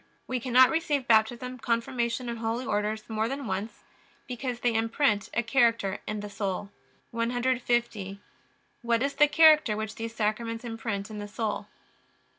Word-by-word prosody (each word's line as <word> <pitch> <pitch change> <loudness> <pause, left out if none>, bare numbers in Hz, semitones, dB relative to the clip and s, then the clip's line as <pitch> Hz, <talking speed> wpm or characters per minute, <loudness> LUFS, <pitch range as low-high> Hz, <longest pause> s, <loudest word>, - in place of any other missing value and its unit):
We 255 -1 -2
cannot 255 +1 +5
receive 295 -5 0
Baptism, 240 +3 +2
Confirmation, 235 +1 -1
and 235 -1 -4
Holy 230 +3 -2
Orders 210 +1 -2
more 220 0 -1
than 275 +2 -4
once, 200 +2 -4 0.4
because 250 -1 -4
they 240 -1 +2
imprint 225 -1 +1
a 240 - +2
character 230 -5 +2
in 215 -1 -3
the 210 - -6
soul. 200 -1 -4 0.4
150. 240 -2 0
Q. - - -21 0.6
What 235 0 +1
is 280 0 0
the 295 - +5
character 305 -8 +5
which 220 0 -4
these 230 0 -6
Sacraments 225 +2 -2
imprint 225 -3 -4
in 210 - -6
the 205 - -5
soul? 215 +1 -3
230 Hz, 155 wpm, -28 LUFS, 215-250 Hz, 0.6 s, cannot